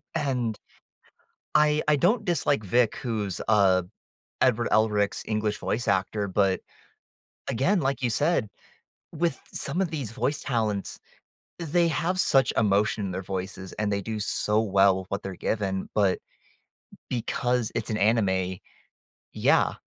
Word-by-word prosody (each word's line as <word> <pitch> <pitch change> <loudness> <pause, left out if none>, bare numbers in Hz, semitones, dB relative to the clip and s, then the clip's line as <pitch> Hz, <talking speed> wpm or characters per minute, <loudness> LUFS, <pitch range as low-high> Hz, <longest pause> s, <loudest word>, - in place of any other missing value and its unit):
And 125 -6 -1 1.0
I 150 0 +4
I 150 - +5
don't 210 - +2
dislike 150 - +1
Vic 120 +3 +2
who's, 105 -8 -3
uh, 95 -4 +4 0.6
Edward 120 -2 +3
Elric's 105 -2 +2
English 105 -1 -1
voice 120 +3 -2
actor, 100 +2 0
but 95 -1 +1 0.9
again, 175 - +2
like 135 -1 -1
you 125 - +2
said, 145 -1 +1 0.7
with 165 -3 -1
some 140 +6 -2
of 185 - 0
these 140 -9 -4
voice 140 +5 -1
talents, 110 -6 -2 0.6
they 170 +1 +2
have 175 +3 -1
such 135 -8 +3
emotion 105 0 +2
in 95 - -3
their 95 +1 -4
voices 95 0 -5
and 105 -1 -2
they 100 0 0
do 110 +2 -4
so 105 0 0
well 95 -2 +4
with 95 - -9
what 100 +1 -3
they're 95 -1 -5
given, 95 -1 -2
but 100 -3 +2 0.9
because 125 0 -1
it's - - -2
an 110 - 0
anime, 95 -4 +1 0.8
yeah, - - +3
110 Hz, 140 wpm, -26 LUFS, 100-135 Hz, 1.0 s, I